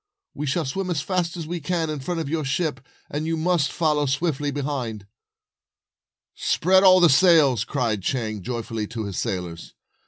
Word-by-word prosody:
We 150 - -4
shall 155 +4 0
swim 185 +8 -3
as 165 -5 0
fast 180 -2 -1
as 165 - -5
we 175 +2 -4
can 165 0 -1
in 150 - -4
front 165 +6 -3
of 160 - -3
your 155 +1 -1
ship, 145 0 -1 0.3
and 150 +2 -3
you 165 0 -1
must 160 -3 +1
follow 150 -3 +1
swiftly 145 +1 -1
behind." 135 -7 -4 1.3
"Spread 190 +2 +3
all 185 -1 +7
the 175 - +7
sails," 145 - +5
cried 115 -6 -1
Chang, 110 -1 -2
joyfully, 115 -1 -4
to 110 -1 -5
his 100 -2 -4
sailors. 85 -3 -4
145 Hz, 175 wpm, -23 LUFS, 125-170 Hz, 1.3 s, all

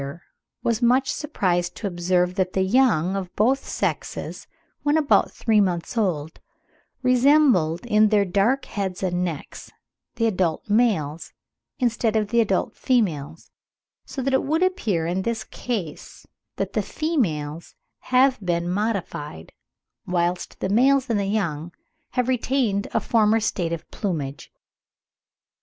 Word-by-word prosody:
150) 140 +5 -8 0.3
was 230 0 0
much 255 +3 +3
surprised 180 - -1
to - - -7
observe 180 -1 +1
that 185 -1 -1
the 190 - +2
young 195 -5 +3
of 185 -2 -4
both 260 +6 +2
sexes, - - -4 0.3
when 295 +1 +2
about 300 -3 +3
three 220 -2 +2
months 180 +1 -1
old, 165 -8 -1 0.6
resembled 250 - +4
in 215 -2 +4
their 205 -2 +3
dark 200 +9 +1
heads 195 -3 -4
and 180 -1 0
necks 165 -5 -6 0.4
the 230 -1 0
adult 180 -7 0
males, 205 -9 +1 0.4
instead 230 -4 0
of 210 -2 +1
the 235 +1 +3
adult 195 -4 0
females; 165 - -1 0.5
so 265 - -6
that 270 +1 0
it 265 - +4
would 320 +5 +1
appear 215 - 0
in 180 +3 -1
this 230 +2 -2
case 200 -11 -6 0.3
that - - -3
the - - +1
females 170 - -2 0.2
have 260 +1 +3
been 170 -1 0
modified, 180 - -3 0.6
whilst 175 0 -1
the 190 - -1
males 260 +4 +3
and 215 - +1
the 200 - -1
young 175 -6 -2 0.4
have 250 -1 0
retained 250 -5 0
a - - +2
former 220 0 +3
state 180 -6 -1
of 170 -1 -5
plumage.) 150 - -4
200 Hz, 140 wpm, -23 LUFS, 175-245 Hz, 0.6 s, resembled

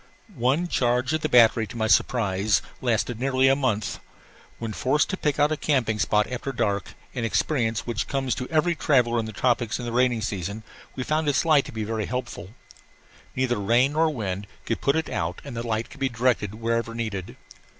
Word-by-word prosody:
One 135 +9 +1
charge 125 -1 +1
of 155 - 0
battery, 115 -6 +5
to 115 - -9
my 110 - 0
surprise, 105 -4 +2 0.2
lasted 120 -1 0
nearly 130 0 +2
a 135 - +5
month. 110 -7 -1 0.6
When 115 -2 -5
forced 140 - +1
to - - 0
pick 150 -5 -1
out 145 +1 +4
a 155 - 0
camping 125 -8 0
spot 105 +1 +2
after 125 +2 -4
dark, 105 -6 -2 0.2
an 120 - -3
experience 115 +1 0
which 115 -1 -2
comes 135 -3 -1
to 125 - -4
every 165 +2 +2
traveller 125 -7 +2
in 115 - -2
the - - -5
tropics 120 +1 0
in 125 - -6
the 120 - -3
rainy 125 -1 +2
season, 100 0 -4 0.3
we 130 - -3
found 155 +2 0
its 145 - +1
light 155 -4 +4
very 110 -1 -3
helpful. 120 -5 -5 0.8
Neither 130 -4 0
rain 120 +7 +3
nor 160 +1 +3
wind 105 -7 -4 0.2
could 115 - -2
put 140 - +2
it 160 -1 0
out 85 +2 -3
and 140 -4 -8
the 115 +1 -4
light 110 +1 -2
could - - -13
be 135 -1 +1
directed 120 -4 0
wherever 115 +1 -1
needed. 105 -6 -4
120 Hz, 190 wpm, -25 LUFS, 110-135 Hz, 0.8 s, battery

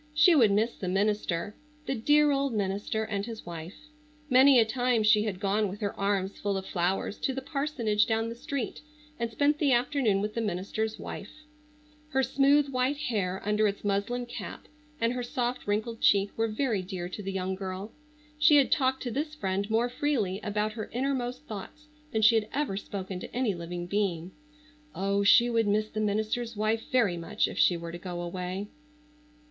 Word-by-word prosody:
She 315 +4 +6
would 245 -9 +6
miss 215 +4 +2
the 185 - -5
minister,—the 210 - -2
dear 295 +5 +4
old 275 -3 0
minister 205 +2 -1
and 205 -2 -2
his 225 0 -7
wife. 170 +1 -7 0.6
Many 260 +1 +7
a 225 - +5
time 245 -1 +1
she 215 0 +4
had 195 -4 -3
gone 205 +1 +1
with 200 +2 -7
her 205 -1 -1
arms 200 -1 -1
full 200 -1 -1
of 190 - -5
flowers 185 +3 -1
to 270 - -1
the 265 - -3
parsonage 275 -8 0
down 225 0 0
the 230 - -4
street, 250 +2 -4 0.4
and 235 0 -1
spent 290 +6 +1
the 280 -4 +3
afternoon 240 -4 +2
with 210 +1 -2
the 230 - -2
minister's 215 +2 -2
wife. - - -7 0.8
Her 265 -2 +1
smooth 280 +2 +3
white 260 +2 0
hair 205 -10 -2
under 210 +1 +2
its 200 0 -4
muslin 205 +5 -1
cap, 240 - -8 0.3
and 230 +1 +1
her 250 - -3
soft 245 0 -3
wrinkled 220 +3 -1
cheek 200 0 +4
were 225 0 +1
very 220 -2 0
dear 180 -1 -5
to 195 - -6
the 195 -1 -4
young 190 0 -2
girl. 190 +2 -5 0.5
She 300 0 +6
had 280 -2 +4
talked 265 -2 +2
to 245 - -3
this 300 +5 -3
friend 195 -5 -2
more 225 +2 +2
freely 245 -8 -1
about 210 +1 -1
her 220 -1 -6
innermost 255 0 -2
thoughts 300 +6 -9 0.2
than 220 -1 0
she 220 +2 +7
had 220 -1 +2
ever 280 -9 -1
spoken 195 -2 -5
to - - -9
any 245 -5 +1
living 175 0 -5
being. 180 -3 -1 0.6
Oh, 200 +1 0
she 235 +4 +6
would 230 -2 +1
miss 215 +1 +1
the 215 - -4
minister's 215 +2 -1
wife 220 +1 0
very 225 -9 +3
much 200 +6 0
if - - -6
she 175 - +4
were 170 0 -7
to 175 - -7
go 175 -1 -5
away. 180 +3 -4
215 Hz, 190 wpm, -28 LUFS, 195-250 Hz, 0.8 s, Many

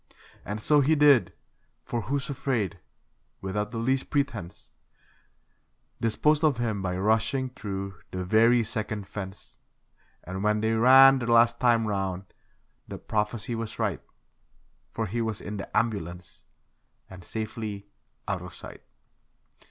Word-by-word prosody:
And 105 +1 -5
so 145 +7 +4
he 155 +4 +3
did; 140 - +5 0.5
for 120 - -2
'Who's 135 +4 -2
Afraid', 120 -9 -2 0.6
without 105 +2 -3
the 115 - -6
least 130 +4 0
pretence, 115 - -3 1.3
Disposed 150 +7 +2
of 150 -5 +3
him 110 -4 -1
by 90 -1 -2
rushing 110 +6 +1
through 100 -5 -6
the 95 0 -4
very 115 +5 +4
second 110 -2 -4
fence; 95 -2 -8 0.6
And 95 +2 -5
when 105 0 +2
they 110 +1 0
ran 130 +4 +7
the 120 -1 -2
last 115 0 +5
time 120 -2 +3
round 95 -3 -2 0.6
the - - -7
prophecy 105 +2 -2
was 115 -1 -4
right 105 -7 -1 0.9
For 110 - -3
he 115 +4 -2
was 110 -2 -2
in 105 0 -6
the 100 - -4
ambulance, 90 -6 -3 0.6
and 95 -1 -12
safely 110 -1 -5 0.4
'out - - -2
of - - -9
sight'. - - -10
110 Hz, 135 wpm, -27 LUFS, 100-120 Hz, 1.3 s, ran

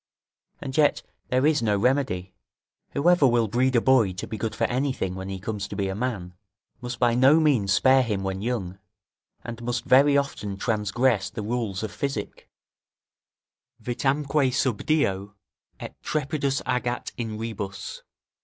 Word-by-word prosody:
And 130 - -5
yet 150 -2 +3 0.2
there 130 +2 +1
is 155 -4 +3
no 105 -3 +1
remedy; 100 -6 0 0.6
whoever 165 0 +4
will 120 -2 +2
breed 125 +4 +1
a 120 - +4
boy 120 -8 +4
to 90 - -5
be - - -6
good 110 +1 -3
for - - -2
anything 130 -7 -1
when 95 +1 -6
he 95 -1 -5
comes 105 +1 -4
to - - -7
be 100 -1 -1
a - - -2
man, 105 -6 -3 0.5
must 120 0 -5
by 120 -1 +3
no 135 +6 +5
means 130 -11 +2
spare 130 +6 +5
him 105 -6 -2
when 95 0 -3
young, 100 -6 -3 0.6
and 115 0 -7
must 120 0 -3
very 140 +2 +5
often 105 -8 -3
transgress 105 0 +1
the 105 +1 -6
rules 110 -3 -2
of 110 - -4
physic: 115 -2 -5 1.3
"Vitamque 135 +4 0
sub 125 -4 -1
dio, 100 -10 0 0.4
et - - -7
trepidis 140 -2 -1
agat 125 -1 -2
In 110 -3 -4
rebus." 105 -3 -6
120 Hz, 155 wpm, -25 LUFS, 100-130 Hz, 1.3 s, no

